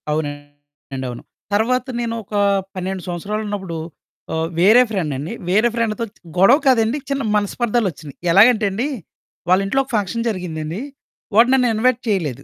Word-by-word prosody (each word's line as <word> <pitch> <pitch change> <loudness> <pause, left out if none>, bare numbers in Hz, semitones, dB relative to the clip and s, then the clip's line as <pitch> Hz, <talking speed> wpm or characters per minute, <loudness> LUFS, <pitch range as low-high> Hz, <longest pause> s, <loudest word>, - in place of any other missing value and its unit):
అవునండి. 145 -2 -6
అవును. 120 - -8 0.3
తర్వాత 245 +4 +2
నేనొకా 230 -3 -2 0.3
12 185 0 -3
సంవత్సరాలున్నప్పుడు 195 0 -4 0.6
ఆహ్, 160 0 -1
వేరే 215 +8 +7
ఫ్రెండండి, 155 -8 -3 0.2
వేరే 215 +6 +3
ఫ్రెండతో 230 0 -1
చ్ - - -27 0.2
గొడవ 195 +9 +6
కాదండి, 240 -1 +3
చిన్న 275 0 -1
మనస్పర్ధాలొచ్చినియి. 205 - -1 0.2
ఎలాగంటెండి, 215 +2 +4 0.6
వాళ్ళింట్లో 195 +7 +3
ఒక 265 - -19
ఫంక్షన్ 220 +3 -1
జరిగిందండి. 175 -3 -4 0.5
వాడు 235 +3 +6
నన్ను 255 -2 +4
ఇన్వైట్ 250 +2 +2
చెయలేదు. 155 - -1
200 Hz, 120 wpm, -20 LUFS, 165-230 Hz, 0.6 s, వేరే